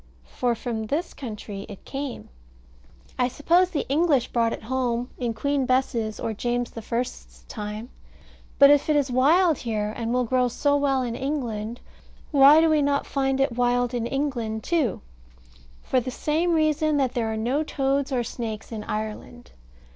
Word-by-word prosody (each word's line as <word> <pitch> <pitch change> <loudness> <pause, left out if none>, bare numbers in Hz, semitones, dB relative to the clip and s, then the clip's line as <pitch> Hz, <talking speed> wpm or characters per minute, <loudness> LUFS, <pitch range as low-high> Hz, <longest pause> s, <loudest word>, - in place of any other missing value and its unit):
For 240 - -1
from 225 -2 -4
this 320 +9 -2
country 210 -5 -7
it 200 - -11
came. 275 -2 -6 0.9
I 250 - +3
suppose 335 +8 +2
the 310 - -3
English 285 -3 +2
brought 230 -1 +1
it - - -6
home 245 0 -1
in 235 -3 -2
Queen 280 +2 0
Bess's 240 -4 0
or 225 - -2
James 240 +2 -2
the 230 - -7
First's 65 - -5
time. 210 - -6 0.7
But 280 0 +8
if 290 +1 +3
it 305 - +4
is 285 -3 +1
wild 310 +6 +4
here, 215 -2 -2
and 230 -1 -3
will 250 +1 +2
grow 250 +1 +2
so 285 +4 +1
well 275 -2 +1
in 240 -2 -3
England, 240 -5 -3 0.5
why 290 +2 +7
do 325 - +4
we 310 -2 +3
not 280 0 +1
find 270 -1 0
it 270 -3 +1
wild 245 0 +1
in 235 -1 -1
England 240 -6 -2
too? 315 - 0 0.8
For 260 - +1
the 250 +1 -4
same 315 +7 0
reason 310 -1 +2
that 265 -3 +1
there 225 -2 -1
are 220 - -3
no 245 +7 0
toads 275 -2 -1
or 250 -2 +1
snakes 225 -2 -6
in 215 -2 -5
Ireland. 215 +3 -6
250 Hz, 170 wpm, -25 LUFS, 230-285 Hz, 0.9 s, But